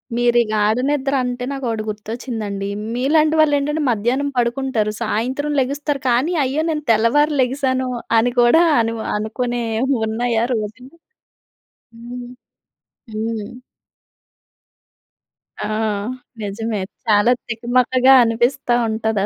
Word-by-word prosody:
మీరు 240 0 +2
ఈ - - +3
గాడ 215 +1 +2
నిద్ర 280 -1 0
అంటే, 250 0 -3
నాకు 270 -2 -5
ఒకటి 220 -1 -2
గుర్తొచ్చిందండి. 210 -2 -5 0.3
మీలాంటి 305 +5 +2
వాళ్ళు 295 -2 +4
ఏంటంటే, 295 +2 -1
మధ్యాహ్నం 245 +6 0
పడుకుంటారు. 240 -3 0
సాయంత్రం 255 +7 -1
లెగుస్తారు 280 +1 -2
కానీ, 260 +9 +2
అయ్యో! 275 +4 0
నేను 300 -2 -2
తెల్లవారు 290 +8 +3
లెగిసాను 260 0 0 0.3
అని 245 +2 +1
కూడా 240 +8 +5 0.2
అనువు 225 -1 -1
అనుకునే 240 +3 -2 0.4
ఉన్నాయా 230 +1 0
రోజు‌లు? 230 +6 -5 1.0
హ్మ్. 240 +1 -8 0.9
హ్మ్. 225 +2 -4 2.1
ఆ! - - -2 0.7
నిజమే. 210 0 -3 0.2
చాలా 215 +2 +4 0.2
తికమకగా 250 +3 +3
అనిపిస్తా 240 +3 +1
ఉంటది 220 -2 -1
240 Hz, 105 wpm, -19 LUFS, 220-270 Hz, 2.1 s, కూడా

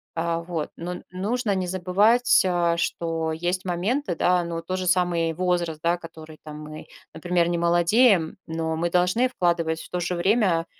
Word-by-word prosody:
А 165 0 -1
вот. 170 -2 -4
Но 175 +1 -5
н - - -9
нужно 205 +4 -1
не 185 -1 -2
забывать, 200 +7 +3
а, 170 -2 +1
что 165 -1 -2
есть 175 +3 -2
моменты, 185 +5 -1
да, 180 +1 +2
ну 170 0 -5
вот 165 0 -5
тот 185 0 -2
же 185 - -3
самый 175 -2 +1
возраст, 175 -2 -1
да, 170 +1 +2
который, 160 -2 -12
там, 150 -1 -9
мы, 155 0 -9 0.3
например, 175 +1 0
не 175 - 0
молодеем, 175 +2 +3
но 160 -1 -3
мы 170 +2 0
должны 180 +8 +2
вкладывать, 170 -8 0
в - - -12
то 180 - -3
же 180 +1 -2
время, 185 -2 +2
175 Hz, 185 wpm, -24 LUFS, 165-185 Hz, 0.3 s, забывать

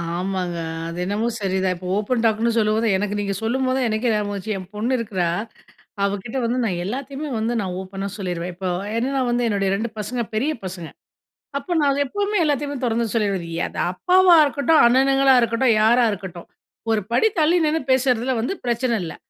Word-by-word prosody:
ஆமாங்க, 180 -1 -2 0.3
அது 170 +1 -6
என்னமோ 210 +4 -1
சரிதான். 190 -1 0
இப்போ 180 +1 -8
ஓப்பன் 230 +3 0
டாக்ன்னு 225 +1 +2
சொல்லும்போது, 220 +1 +1
எனக்கு 205 +1 -2
நீங்க 200 -1 -1
சொல்லும்போது 255 +3 0
தான் 255 -3 +1
எனக்கே 220 +2 0
ஞாபகம் 210 -1 -1
வந்துச்சு. 200 +1 -3
என் 185 -1 -9
பொண்ணு 230 +5 -1
இருக்கிறா, 195 -6 -1 0.8
அவகிட்ட 205 +5 -2
வந்து 245 +2 0
நான் 180 -5 -1
எல்லாத்தையுமே 275 +6 -5
வந்து 225 +2 -1
நான் 185 -2 -4
ஓப்பனா 195 +1 -5
சொல்லீருவேன். 180 -2 -4
இப்போ 185 0 -3 0.3
என்னென்னா 265 +3 0
வந்து 240 0 +1
என்னுடைய 200 -2 0
2 225 +4 -2
பசங்க 240 +4 -3
பெரிய 285 +8 +1
பசங்க. 180 -3 -6 0.7
அப்போ 350 +6 -6
நான் 290 -2 +3
அத 280 - -1
எப்பவுமே 410 +6 -1
எல்லாத்தையுமே 290 -1 -1
தொறந்து 230 0 +1
சொல்லீருவேன். 200 -6 0
இ - - -3
அது - - -10
அப்பாவா 365 - +5
இருக்கட்டும், 295 +2 +3
அண்ணனுங்களா 270 +2 +4
இருக்கட்டும், 230 0 +2
யாரா 235 +3 +5
இருக்கட்டும். 180 -3 -7 0.4
ஒரு 220 -1 +2
படி 445 - +4
தள்ளி 320 +3 +4
நின்னு 310 +1 +1
பேசறதுல 255 -1 +2
வந்து 240 - -1
பிரச்சன 235 -1 0
இல்ல. 160 - -6
225 Hz, 175 wpm, -22 LUFS, 195-260 Hz, 0.8 s, அப்பாவா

